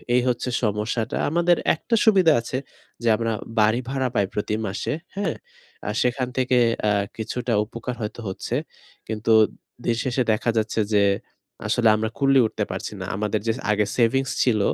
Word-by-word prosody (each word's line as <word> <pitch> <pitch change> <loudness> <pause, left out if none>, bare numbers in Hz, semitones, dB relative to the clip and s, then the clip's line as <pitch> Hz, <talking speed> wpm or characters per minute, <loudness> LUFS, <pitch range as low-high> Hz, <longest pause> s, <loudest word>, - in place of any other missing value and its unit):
এই 125 - +4
হচ্ছে 125 +1 0
সমস্যাটা। 110 +2 -1
আমাদের 175 +2 +3 0.2
একটা 230 +8 -1
সুবিধা 190 -7 +6
আছে 125 +2 -4 0.5
যে - - 0
আমরা 115 0 -1 0.3
বাড়ি 110 +3 +4
ভাড়া 135 -1 0
পাই 100 - +3
প্রতি 105 +1 -1
মাসে, 100 +9 -2 0.2
হ্যাঁ? 200 -1 -1 0.5
আর 105 - -1
সেখান 125 0 0
থেকে 125 -1 +2 0.3
অ্যা 105 -1 +3 0.2
কিছুটা 120 +2 -2
উপকার 120 +2 -6
হয়তো 105 +2 -5
হচ্ছে। 95 - -4 0.5
কিন্তু 110 +1 -1 0.5
দিনশেষে 120 +2 0
দেখা 110 +2 -1
যাচ্ছে 110 +1 0
যে, 100 -1 +5 0.6
আসলে 115 -2 +3
আমরা 110 0 -1
কুলিয়ে 135 -3 +4
উঠতে 110 - -3
পারছি 95 +3 -5
না। - - -3
আমাদের 105 +1 -1
যে 115 - +3 0.2
আগে 105 0 +2
সেভিংস 135 +3 +2
ছিল 115 -5 +2
115 Hz, 160 wpm, -23 LUFS, 105-130 Hz, 0.6 s, সুবিধা